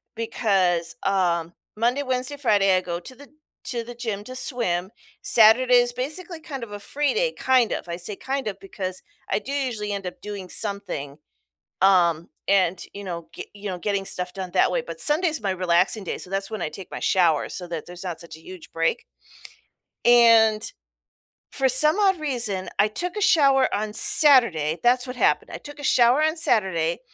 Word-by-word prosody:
because, 195 -7 0
um, 175 -3 0 0.2
Monday, 240 +6 0
Wednesday, 255 +2 -2
Friday, 205 -8 +3
I - - 0
go 175 -1 -5
to 255 +9 -12
the 285 +3 -15 0.4
to 235 -2 -3
the 240 +1 -10
gym 220 -4 -4
to 255 - -8
swim, 195 -9 0 0.3
Saturday 235 +3 +5
is 245 0 +2
basically 320 +7 -5
kind 285 -5 -8
of 225 - -9
a 205 - -7
free 290 +7 -1
day, - - +1
kind 255 -4 +2
of, - - -4
I 170 - -3
say 180 +4 -4
kind 270 +3 -4
of, 200 -2 -5
because 185 -1 -6 0.3
I 200 - 0
do 270 - -8
usually 245 -7 -3
end 200 -1 -4
up 180 - -7
doing 200 -3 -7
something, 200 -10 -4 0.7
um, 170 -3 +3 0.2
and, 185 -3 +2
you 200 - -7
know, 170 -3 -6
ge - - -8
you 205 -1 -7
know, 180 - -4
getting 200 +1 -2
stuff 180 -1 -3
done 190 -2 -6
that - - +3
way, - - 0
but 485 - -9
Sunday's 315 +1 +2
my 195 -2 -1
relaxing 185 +3 +1
day, - - -4
so - - -8
that's 195 0 -2
when 220 -1 -6
I - - -2
take 185 +4 -10
my - - -6
showers 170 -6 +1
so 180 - -5
that 170 -3 -6
there's 180 +1 -9
not 180 -3 -5
such 170 -2 -9
a - - -15
huge 180 +1 -12
break. 165 0 -1 1.0
And, 230 -3 +5 0.9
for 270 -1 +1
some 300 - +6
odd 385 -4 +2
reason, 240 -10 -1
I 205 - +4
took 355 - -4
a - - -2
shower 275 -8 +4
on 210 +1 -2
Saturday- 210 - +4
that's 250 +2 +2
what 250 - -6
happened- - - +1
I - - -4
took 290 0 -12
a - - -9
shower 250 +1 +4
on 315 +2 +1
Saturday, 185 - +1
210 Hz, 195 wpm, -23 LUFS, 185-255 Hz, 1.0 s, some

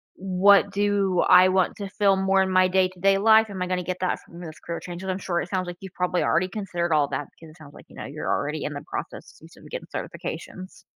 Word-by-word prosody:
"What 195 +1 +4
do 200 -2 +1
I 185 +1 +6
want 185 -1 +1
to 200 -2 -6
feel 200 -1 +2
more 190 0 +2
in 190 0 0
my 185 0 +4
day-to-day 185 +1 +2
life? 220 0 +5
Am 190 -2 -6
I 180 - -1
gonna 180 -1 -2
get 185 +1 -4
that 185 - -1
from 170 +1 -14
this 160 -2 -9
career 170 0 -6
change?" 175 +1 -8
And 190 - -2
I'm 185 - -3
sure 175 -2 -2
it - - -7
sounds 185 -2 -2
like 175 0 -7
you've 190 -1 -10
probably 180 0 -1
already 185 +3 +1
considered 175 -5 -2
all 145 -2 +3
that 145 - -4
because 160 -1 -15
it 160 - -19
sounds 145 -2 -14
like, - - -15
you - - -16
know, - - -7
you're - - -6
already 150 +1 -2
in 150 - -4
the 145 +1 -7
processes - - -8
of - - -15
getting - - -7
certifications. 185 0 -7
185 Hz, 250 wpm, -24 LUFS, 175-195 Hz, -, I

